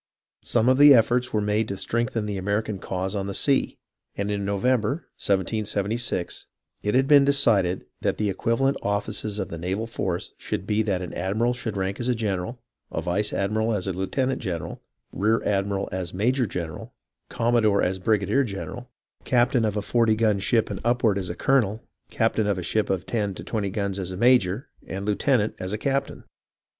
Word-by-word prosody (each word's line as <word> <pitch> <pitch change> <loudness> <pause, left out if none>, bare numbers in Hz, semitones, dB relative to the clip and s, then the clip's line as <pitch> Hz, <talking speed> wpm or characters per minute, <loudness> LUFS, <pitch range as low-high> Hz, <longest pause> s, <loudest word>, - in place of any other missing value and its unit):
Some 115 0 +1
efforts 125 -2 +6
were 105 - +1
made 105 +1 +1
to 100 - -4
strengthen 115 0 -1
the 100 -2 -3
American 100 +1 -1
cause 95 +2 -3
on 100 -1 -2
the 100 - -4
sea, 140 -2 +1 0.4
and 100 +1 -1
in 100 -1 -2
November, 115 - 0 0.2
1776, 100 0 -1 0.3
it 105 +3 0
had 135 +1 +3
been 145 -1 +7
de 140 - +4
cided 100 -10 +2 0.2
that - - 0
the 105 -2 0
equivalent 125 +7 +1
offices 105 +1 -2
of 95 -4 -3
the 85 - -6
naval 95 +6 -2
force 90 -6 -3
should 90 - -4
be 105 +1 +1
that 95 -4 -1
an 90 - -7
admiral 110 +7 0
should 115 -4 -5
rank 95 +1 -2
as 120 +1 -1
a 125 - +2
general, 105 +1 -2 0.3
a - - -2
vice 100 +4 -1
admiral 110 +3 0
as 95 - -2
lieutenant 100 +8 -1
general, 90 -6 -4 0.3
rear 110 +3 +1
admiral 100 -1 0
as 90 -1 -4
major 125 +5 +1
general, 85 -5 -6 0.3
com 120 +1 0
modore 110 -4 +3
as 95 +1 -1
brigadier 105 +6 +2
general, 120 +3 -6 0.3
captain 120 -1 +2
of 105 -1 0
a 105 - -1
forty 115 -1 +2
gun 110 -2 +2
ship 110 +3 +1
and - - -5
upward 120 -4 +2
as 90 - -5
a 85 - -4
colonel, 115 -6 +2 0.3
captain 110 -2 +1
of 100 -2 +1
a 90 - -4
ship 105 +5 0
of 95 -2 -1
ten 105 -4 -1
to - - -8
twenty 105 -3 -2
guns 100 -1 -2
as 95 -1 -4
major, 120 0 +3 0.2
and 95 +2 -5
a - - +3
lieutenant 110 0 +1
as 95 +3 -3
captain. 135 +5 -2
105 Hz, 185 wpm, -25 LUFS, 95-120 Hz, 0.4 s, been